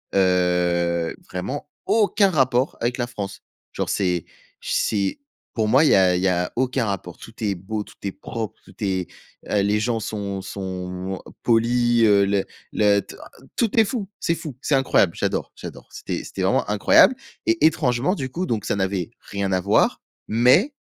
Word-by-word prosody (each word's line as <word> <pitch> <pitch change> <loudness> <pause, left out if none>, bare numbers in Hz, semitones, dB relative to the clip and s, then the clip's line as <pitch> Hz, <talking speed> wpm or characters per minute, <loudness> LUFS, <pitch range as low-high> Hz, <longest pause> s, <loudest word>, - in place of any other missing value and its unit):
Heu, 90 -2 +2
vraiment 130 +11 -5 0.2
aucun 205 -2 +3
rapport 130 -4 +1
avec 120 +1 0
la 120 - -1
France. 100 -5 -6 0.3
Genre - - -2
c'est 90 -4 0 0.4
j - - -5
c'est 100 -3 0 0.3
pour 110 -2 0
moi, 130 - +5
il 155 - +5
y - - +6
a 95 -2 +4
il 90 - 0
y 95 - +2
a 90 -1 0
aucun 130 -1 0
rapport. 95 -4 -4
Tout 115 - -12
est 100 -2 0
beau, 105 +4 -4
tout - - -17
est 100 - -2
propre, 110 +3 -6
tout 95 - -17
est, 95 -3 -1 0.4
heu, 105 - +2
les 105 +1 +2
gens 115 0 0
sont 100 -2 -4
sont 95 -2 -5
moi 90 +1 -5 0.2
polis, 120 0 +3
heu, 100 -1 +5
le 100 0 +1 0.3
le 105 -1 +4
t - - -12 0.4
tout 230 0 +2
est 220 - +6
fou, 205 -2 -3
c'est 165 - 0
fou! 150 -7 -7
C'est 150 - +1
incroyable! 125 -9 +3
J'adore, - - -2
j'adore. - - -9
C'était - - -5
c'était - - -6
vraiment - - +2
incroyable 105 - +5 0.3
et 335 0 +2
étrangement 140 -1 +2
du 130 -7 -4
coup, 175 +8 -3
donc 115 - -2
ça - - 0
n'avait 95 -1 -1
rien 100 -1 -3
à 95 - +2
voir, 100 +3 +2 0.3
mais 125 - +4
105 Hz, 185 wpm, -23 LUFS, 95-125 Hz, 0.4 s, y